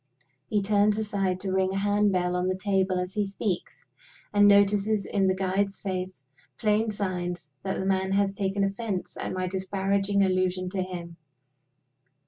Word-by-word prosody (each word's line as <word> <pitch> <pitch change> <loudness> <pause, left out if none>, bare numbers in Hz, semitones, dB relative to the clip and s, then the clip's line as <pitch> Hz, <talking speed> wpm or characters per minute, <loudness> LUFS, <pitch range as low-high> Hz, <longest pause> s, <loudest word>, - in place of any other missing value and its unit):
He 205 -2 0
turns 205 +1 +3
aside 200 -4 -1
to 190 - -3
ring 190 0 +1
a - - -1
hand 205 +1 +2
bell 180 -1 0
on 180 0 0
the 185 - 0
table 190 -1 +1
as 180 +1 -3
he 210 - +1
speaks; 195 -2 -4 0.5
and 205 0 +6
notices 205 +1 +4
in 195 -2 +1
the 185 - +2
guide's 195 +1 -1
face 185 -5 -4 0.3
plain 215 0 +2
signs 180 -5 -3
that 190 - -3
the 190 - -2
man 190 0 +1
has 200 0 +2
taken 200 0 -1
offense 195 -1 -3
at - - -4
my 185 0 -2
disparaging 195 +1 0
allusion 185 -1 0
to 190 -1 -1
him. 175 -2 -6
195 Hz, 165 wpm, -27 LUFS, 185-205 Hz, 0.5 s, and